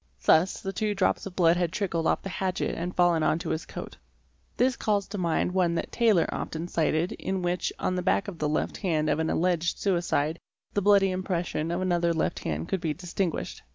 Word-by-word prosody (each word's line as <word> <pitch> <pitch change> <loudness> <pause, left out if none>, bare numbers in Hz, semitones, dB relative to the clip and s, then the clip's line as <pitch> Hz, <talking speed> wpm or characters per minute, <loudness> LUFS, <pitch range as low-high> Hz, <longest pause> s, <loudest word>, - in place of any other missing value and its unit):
Thus, 175 +4 +4
the 195 - -4
two 210 -1 -1
drops 195 0 +1
of 185 - -10
blood 170 -1 +4
had 175 -2 0
trickled 170 -4 -1
off - - +1
the 195 - -4
hatchet 185 0 -2
and 175 +2 -4
fallen 175 -2 +3
on 155 +1 +2
his 160 0 -3
coat. - - -8 0.6
This 255 +2 +4
case - - -12
calls 205 -2 +1
to 205 - -4
mind 170 0 +1
one 180 -2 +2
that - - -3
Taylor 220 -8 +3
often 160 +2 -4
cited 165 0 +1
in 190 -1 -3
which 175 0 0
on 185 - -1
the 180 - -1
back 195 +3 +1
of 190 -4 -7
the 150 - 0
left 150 - -1
hand 155 -6 0
of 150 - 0
an 160 - 0
alleged 170 -1 +1
suicide 170 -4 0 0.3
the 205 - +1
bloody 200 -1 +5
impression 180 -3 -2
of 175 +2 -1
another 170 -2 +1
left 160 - -1
hand 80 +1 -3
could 190 - -2
be 155 -3 -1
distinguished. 180 -1 -3
175 Hz, 215 wpm, -27 LUFS, 165-190 Hz, 0.6 s, bloody